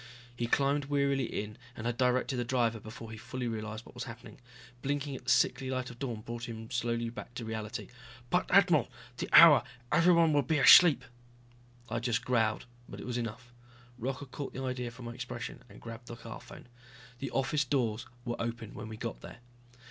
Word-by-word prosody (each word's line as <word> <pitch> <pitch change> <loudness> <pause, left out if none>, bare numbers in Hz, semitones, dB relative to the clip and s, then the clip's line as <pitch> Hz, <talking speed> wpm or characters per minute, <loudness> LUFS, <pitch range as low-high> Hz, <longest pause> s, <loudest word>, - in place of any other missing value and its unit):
He 120 0 -2
climbed 140 +3 +2
wearily 140 -2 +1
in 105 0 -5 0.2
and 110 - -6
had 120 0 0
directed 125 +1 +1
the 120 - 0
driver 120 -2 +1
before 110 +1 -9
he 110 - -7
fully 125 +2 -4
realized 110 0 -5
what - - -14
was 125 0 -5
happening. 115 -2 -10 0.4
Blinking 140 +1 -2
at 125 - -10
the - - -2
sickly 130 0 +3
light 130 -1 -2
of 120 - -14
dawn 120 -6 -4
brought 120 +2 -6
him 110 +1 -8
slowly 115 -1 -1
back 120 0 -9
to 120 - -5
reality. 110 -1 -5 0.4
"But... 180 - +2
admiral... 180 -9 +5 0.3
the - - -3
hour! 155 -7 +9 0.3
Everyone 170 -2 +5
will 145 - +4
be 150 +4 0
asleep...." 160 +2 +8 0.8
I 115 0 -2
just 120 0 -1
growled, 110 -4 +1 0.2
but - - -8
it - - -7
was 125 -1 -2
enough. 120 +1 -6 0.5
Rocca 130 +4 -3
caught 140 +1 -7
the 130 - -5
idea 125 -2 -2
from 120 +1 -11
my 120 - -5
expression 120 -1 -6
and 100 - -13
grabbed 115 +1 -9
the 120 - -7
car 115 -1 -9
phone. 155 - -12 0.5
The 135 - -3
office 135 +3 +1
doors 120 -5 -1 0.2
were 120 -1 -3
open 115 -2 -4
when 110 - -7
we 110 - -7
got - - -5
there. - - -10
125 Hz, 195 wpm, -31 LUFS, 115-135 Hz, 0.8 s, hour